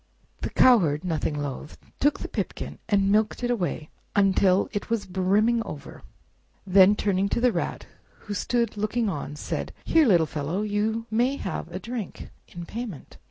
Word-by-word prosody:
The - - -3
Cowherd, 175 - +4
nothing 160 -4 -1
loath, 145 +1 -6 0.2
took 290 +1 +2
the - - -4
pipkin - - -5
and 200 -2 +3
milked 215 +3 +1
away 190 -10 -2 0.2
until 195 -1 +3
it 205 +1 -4
was 225 -3 -1
brimming 200 +5 +2
over; 150 -9 -8 0.6
then 190 +1 +6
turning 200 -1 0
to - - 0
the 250 0 +3
Rat, - - -3 0.4
who 205 - -6
stood 235 +1 -1
looking 215 +2 0
on, 145 -4 -5
said, - - -4
"Here, 320 -4 +4
little 175 -6 +5
fellow, 155 +6 -3
You 215 +2 -1
may 245 +5 +2
have 170 - -5
a 175 - -4
drink, 230 +1 -6 0.2
in 175 -1 -8
payment." 220 - -7
200 Hz, 160 wpm, -26 LUFS, 180-225 Hz, 0.6 s, then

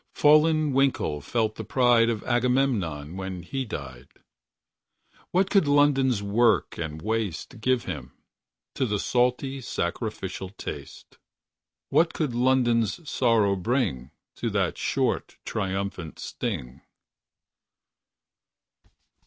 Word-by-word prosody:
59 - - -14
Fallen 155 0 +5
Winkle 130 - +1
felt 110 +7 0
the - - -4
pride 120 -3 +4
Of 115 -3 -2
Agamemnon 120 - 0
When 95 -2 -5
he 135 +8 -3
died. 65 - -7 1.2
What 185 +2 +1
could 195 -7 +4
London's 135 -6 +3
Work 110 +1 +2
and 80 -1 -5
waste 110 +1 -3
Give 130 0 +2
him— 65 -4 -6 0.6
To 130 - 0
that 105 -1 0
salty, 125 +4 0
sacrificial 95 -2 -4
taste? 100 - -9 0.7
What 165 +1 +3
could 150 -6 -1
London's 120 - +2
Sorrow 110 -7 +2
bring— 90 - -1 0.3
To - - -2
that - - 0
short, - - -1
triumphant 95 -4 -3
sting? 60 0 -5
115 Hz, 105 wpm, -26 LUFS, 95-130 Hz, 1.2 s, Fallen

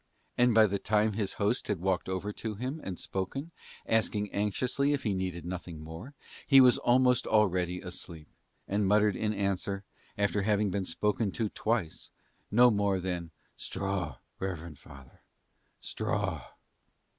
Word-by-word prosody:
And 125 -2 +4
by 110 -1 +8
the 100 -1 -1
time 105 +1 +2
his 100 -2 -2
host 105 +5 0
had 105 -5 -1
walked 95 0 0
over 95 +3 -3
to 110 0 -5
him 130 +8 -4
and 95 -2 -5
spoken, 135 - -4 0.3
asking 105 -2 +1
anxiously 125 +8 +1
if 140 - -2
he 105 - 0
needed 90 -3 -3
nothing 90 -2 -6
more, 80 - -9 0.3
he 135 -2 +8
was 125 -2 +6
almost 125 0 +3
already 90 -4 +2
asleep, 85 -4 -7 0.4
and 100 0 +1
muttered 105 0 +4
in 105 +2 0
answer, 100 -1 -1 0.3
after 100 0 +1
having 105 0 +1
been 100 0 -1
spoken 105 +4 0
to 110 -3 -1
twice, 110 -8 -2 0.4
no 120 +3 +6
more 100 -2 +1
than 90 -2 -3 0.3
"Straw, 95 -1 -3 0.2
reverend 85 -5 -5
father, 70 -2 -15 0.6
straw." - - -2
100 Hz, 145 wpm, -30 LUFS, 95-110 Hz, 0.6 s, by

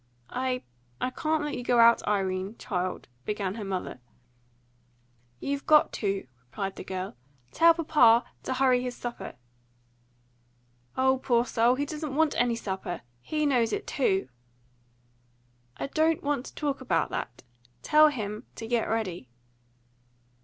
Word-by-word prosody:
"I 255 0 -1 0.4
I 255 - -1
can't 310 +2 0
let 295 - -3
you 245 - -5
go 245 0 +2
out, 230 0 +7
Irene, 195 0 -1
child," 185 -4 -3 0.2
began 200 +2 -2
her 220 0 -6
mother. 190 -8 -4 1.4
"You've 280 0 -3
got 305 -1 +5
to," 200 -2 -1 0.2
replied 195 +11 -4
the - - -6
girl. 185 -2 -5 0.4
"Tell 335 0 +6
papa 250 -8 +5 0.2
ta - - -3
hurry 255 -1 +3
his 250 -1 -4
supper." 240 -1 -6 1.6
"O 265 0 +3
poor 245 -3 +2
soul! 240 +1 +3
He 285 +2 -1
doesn't 300 -1 -5
want 315 0 +3
any 240 -1 +2
supper. 190 -5 -4 0.2
HE 305 - -1
knows 245 -5 +2
it - - -2
too." 195 - +1 1.5
"I - - -3
don't 315 +3 +1
want 285 -3 -1
to - - -12
talk 285 -3 -2
about 260 - 0
that. 120 - -5 0.4
Tell 305 0 +6
him 215 -7 -4
to 225 - -6
get 235 0 0
ready." 185 - -2
245 Hz, 140 wpm, -28 LUFS, 200-280 Hz, 1.6 s, out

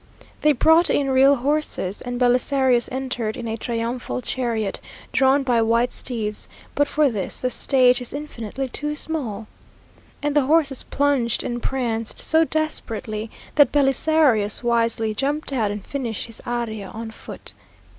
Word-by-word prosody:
They 300 - +5
brought 320 +6 +4
in 275 -2 +1
real 270 +2 +6
horses, 275 -8 -1
and 245 0 -4
Belisarius 250 0 +3
entered 250 -4 -3
in 230 - -5
a 225 - -2
triumphal 235 +2 -3
chariot, 230 -6 -2 0.3
drawn 270 +1 +3
by 245 -3 +2
white 230 +2 +2
steeds; 215 -4 -4 0.3
but 290 0 +2
for 300 0 +2
this 205 -4 -3
the 255 - -1
stage 250 -2 +3
is 245 - -6
infinitely 270 -3 -5
too 295 +4 -3
small, 250 -10 -2 0.8
and 295 0 0
the 285 -3 +3
horses 290 -4 +2
plunged 275 -5 0
and 240 0 -3
pranced 230 -4 -1
so 320 0 +3
desperately, 225 -9 -3 0.2
that 290 -4 +5
Belisarius 270 -6 +3
wisely 230 -2 +1
jumped 280 +5 -2
out 225 -6 +1
and 205 -1 -5
finished 245 -7 -4
his 230 -1 -8
aria 230 -4 -3
on 225 +3 -7
foot. - - -8
250 Hz, 145 wpm, -22 LUFS, 230-280 Hz, 0.8 s, real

